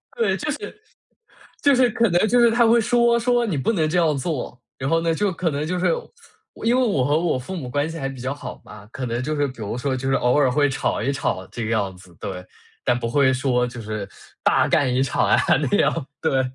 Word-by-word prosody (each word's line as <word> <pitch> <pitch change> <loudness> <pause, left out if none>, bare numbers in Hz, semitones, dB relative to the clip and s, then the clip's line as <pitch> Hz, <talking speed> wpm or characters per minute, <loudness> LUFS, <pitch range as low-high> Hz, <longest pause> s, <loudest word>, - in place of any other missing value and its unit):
对， 465 -1 +1
就 - - -4
是 425 - -7 0.8
就 285 -1 +5
是 250 -1 +4
可 230 +1 +1
能 175 +4 +2
就 245 +3 +3
是 235 -1 +5
他 235 +1 +4
会 235 +1 +5
说 235 0 +3
说 240 0 +2
你 185 -9 -2
不 135 - +1
能 160 -6 +1
这 180 - 0
样 160 -4 +3
做， 130 -4 -4 0.2
然 130 - -3
后 165 0 +2
呢， 165 0 +1
就 200 +3 0
可 170 -1 -1
能 145 +1 -2
就 180 +3 -2
是 180 - +2 0.6
我 - - -9
因 235 +2 +3
为 - - +3
我 195 - +1
和 145 +3 +2
我 165 -5 0
父 165 +10 -7
母 140 -8 -5
关 145 +4 -1
系 165 - -6
还 135 - -3
比 135 -1 -9
较 130 +2 -2
好 140 - -9
嘛， 105 -1 -12
可 130 - -5
能 120 0 -2
就 155 +3 -2
是 145 -1 +1
比 130 - -9
如 105 +3 -4
说 130 +1 -1
就 130 +1 -3
是 135 - +2
偶 125 +3 +2
尔 140 -3 +3
会 145 +1 +2
吵 135 - -1
一 135 - 0
吵 140 - -2
这 120 - -6
个 110 - -2
样 100 -4 -1
子， 90 -1 -17
对。 90 -1 -6 0.4
但 125 - +2
不 120 -1 -3
会 130 +2 +3
说 125 -2 +1
就 120 0 -9
是 110 -2 -5 0.3
大 - - +3
干 135 -3 +2
一 130 +1 +2
场 130 - 0
啊 - - +4 0.3
那 - - +2
样， 155 -5 +1
对。 135 -5 +2
145 Hz, 275 characters per minute, -22 LUFS, 125-185 Hz, 0.8 s, 就